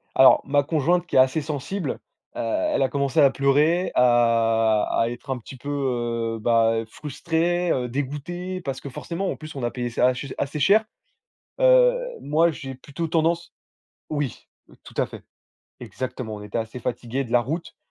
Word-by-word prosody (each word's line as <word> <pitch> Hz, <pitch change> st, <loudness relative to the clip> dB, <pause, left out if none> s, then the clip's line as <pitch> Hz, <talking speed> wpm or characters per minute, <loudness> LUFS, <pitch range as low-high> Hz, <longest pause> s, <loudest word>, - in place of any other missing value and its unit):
Alors 130 Hz, -, +7 dB
ma 145 Hz, +1 st, +2 dB
conjointe 165 Hz, +4 st, +1 dB
qui -, -, -6 dB
est -, -, +7 dB
assez 130 Hz, +5 st, +4 dB
sensible, 150 Hz, +6 st, -4 dB, 0.4 s
heu, -, -, -6 dB
elle 315 Hz, -, 0 dB
a 135 Hz, -, +2 dB
commencé 140 Hz, +1 st, 0 dB
à 140 Hz, -, +7 dB
pleurer, 150 Hz, +7 st, +2 dB
à 115 Hz, -3 st, +3 dB
à 115 Hz, -, +1 dB
être 120 Hz, +2 st, -9 dB
un 135 Hz, -, -1 dB
petit 125 Hz, +3 st, -11 dB
peu, 140 Hz, +4 st, -8 dB, 0.7 s
heu, -, -, -10 dB
bah, 115 Hz, 0 st, +3 dB
frustrée, 165 Hz, +6 st, -1 dB
heu, 125 Hz, -1 st, 0 dB
dégoûtée, 150 Hz, +8 st, -4 dB
parce 135 Hz, -5 st, -5 dB
que, 140 Hz, -, -7 dB
forcément, 170 Hz, +7 st, -4 dB
en -, -, -4 dB
plus, 155 Hz, 0 st, -10 dB
on 135 Hz, -, -5 dB
a 120 Hz, -, 0 dB
payé 120 Hz, -1 st, -3 dB
ça 120 Hz, +1 st, +2 dB
assez 130 Hz, +2 st, -1 dB
ch -, -, -7 dB
assez 145 Hz, +2 st, -3 dB
cher. 200 Hz, +9 st, +5 dB, 0.8 s
Heu, -, -, +6 dB, 0.3 s
moi 160 Hz, +4 st, +3 dB
j'ai 135 Hz, -4 st, -7 dB
plutôt 145 Hz, +5 st, -5 dB
tendance 165 Hz, +1 st, 0 dB, 0.6 s
oui 145 Hz, -5 st, -3 dB, 0.4 s
tout -, -, -13 dB
à -, -, +2 dB
fait. -, -, -11 dB, 0.6 s
Exactement, 125 Hz, 0 st, -5 dB
on 105 Hz, -, -9 dB
était 105 Hz, +2 st, -4 dB
assez 115 Hz, +2 st, -5 dB
fatigués 125 Hz, +2 st, -3 dB
de 120 Hz, -, -9 dB
la 120 Hz, -, +5 dB
route, 160 Hz, +8 st, -5 dB
140 Hz, 180 wpm, -24 LUFS, 120-165 Hz, 0.8 s, Alors